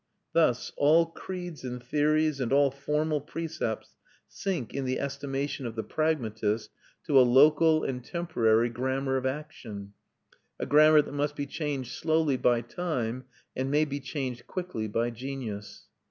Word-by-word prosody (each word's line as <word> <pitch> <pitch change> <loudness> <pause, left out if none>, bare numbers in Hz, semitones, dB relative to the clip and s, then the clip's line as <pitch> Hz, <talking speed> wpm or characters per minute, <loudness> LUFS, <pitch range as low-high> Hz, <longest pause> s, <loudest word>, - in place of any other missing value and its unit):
Thus 155 -8 +2
all 160 +4 +5
creeds 175 -2 -7
and 125 -1 -5
theories 150 +2 +2
and 125 - -1
all 140 0 +4
formal 150 +2 -1
precepts 155 -6 -4 0.3
sink 175 - -3
in 140 - -2
the 130 0 -1
estimation 140 -1 -3
of 115 - -7
the 110 - -2
pragmatist 110 -8 -1 0.3
to 145 -4 +5
a - - +9
local 150 +5 +5
and 125 -2 -3
temporary 120 -9 +1
grammar 130 +3 -1
of 130 0 -1
action; 120 -8 -6 0.7
a - - -2
grammar 155 +1 +6
that - - -9
must 145 +1 -1
be 145 - -3
changed 140 -4 -3
slowly 160 -3 +1
by 120 -2 +2
time, 125 -3 -3 0.3
and 130 +1 -1
may 150 +2 +3
be 145 -1 -4
changed 130 -3 -5
quickly 180 - -4
by 115 +3 0
genius. 115 -5 -6
140 Hz, 150 wpm, -28 LUFS, 120-155 Hz, 0.7 s, a